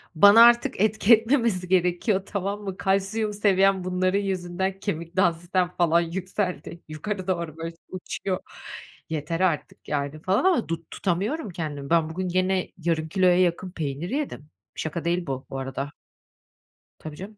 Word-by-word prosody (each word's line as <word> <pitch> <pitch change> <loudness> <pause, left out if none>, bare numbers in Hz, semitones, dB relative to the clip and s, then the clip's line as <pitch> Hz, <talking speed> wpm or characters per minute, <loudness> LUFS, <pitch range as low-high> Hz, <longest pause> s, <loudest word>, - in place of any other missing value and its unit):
Bana 205 +7 +8
artık 240 -2 +4
etki 215 +1 +4
etmemesi 225 -6 0
gerekiyor, 185 +2 +1
tamam 200 +1 -3
mı? 195 -2 -5
Kalsiyum 200 +3 0
seviyem 195 -2 +3
bunların 185 +1 +1
yüzünden 190 0 -2
kemik 170 -3 -4
dansitem 175 0 +1
falan 170 -1 +4
yükseldi. 180 0 -4
Yukarı 185 +5 -5
doğru 170 -4 -2
böyle 165 0 -6
uçuyor. 185 0 -4 0.7
Yeter 160 +1 -3
artık 180 -5 -1
yani 145 +1 -2
falan 190 - +1
ama 355 -11 +3
du 165 -1 -3
tutamıyorum 205 - -2
kendimi. 150 -5 -5
Ben 165 -1 +3
bugün 185 +2 -3
gene 185 +1 0
yarım 165 -2 -1
kiloya 180 -1 +3
yakın 180 +1 0
peynir 155 +1 -4
yedim. 265 - -4 0.3
Şaka 160 +1 -4
değil 175 0 0
bu, 135 -1 -4
bu 135 - -5
arada. 135 +2 -4 1.1
Tabii 155 -1 -8
canım. 200 +6 -9
180 Hz, 145 wpm, -25 LUFS, 165-195 Hz, 1.1 s, Bana